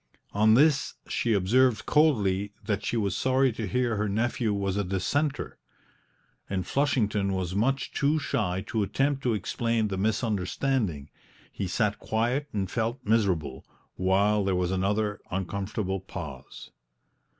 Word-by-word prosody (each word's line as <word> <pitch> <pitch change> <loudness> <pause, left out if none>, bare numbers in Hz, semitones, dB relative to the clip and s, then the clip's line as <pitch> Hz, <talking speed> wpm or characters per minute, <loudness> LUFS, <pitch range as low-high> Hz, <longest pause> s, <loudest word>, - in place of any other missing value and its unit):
On 110 +2 +5
this 145 +2 +3
she 115 - 0
observed 110 +4 +3
coldly 105 -10 +2
that 105 -1 -1
she 120 - -1
was 100 -4 0
sorry 130 0 +2
to 110 -2 -4
hear 120 +1 0
her 105 0 0
nephew 110 +2 0
was 100 -2 -1
a 100 - 0
Dissenter; 135 - -1 0.9
and 95 -2 -2
Flushington 105 -8 +1
was 95 -2 -2
much 130 +7 0
too 145 +2 +1
shy 105 -10 -1
to 110 +1 -1
attempt 135 +7 0
to 120 -4 +1
explain 115 +1 -1
the 95 - -3
misunderstanding; 105 - -1 0.4
he 95 - -4
sat 105 +3 0
quiet 120 +6 0
and 95 -3 -2
felt 120 +2 -2
miserable, 95 - +1 0.3
while 100 +3 +2
there 95 -1 +1
was 90 0 0
another 105 +2 0
uncomfortable 95 +1 -2
pause. 80 -8 -9
105 Hz, 140 wpm, -27 LUFS, 95-120 Hz, 0.9 s, On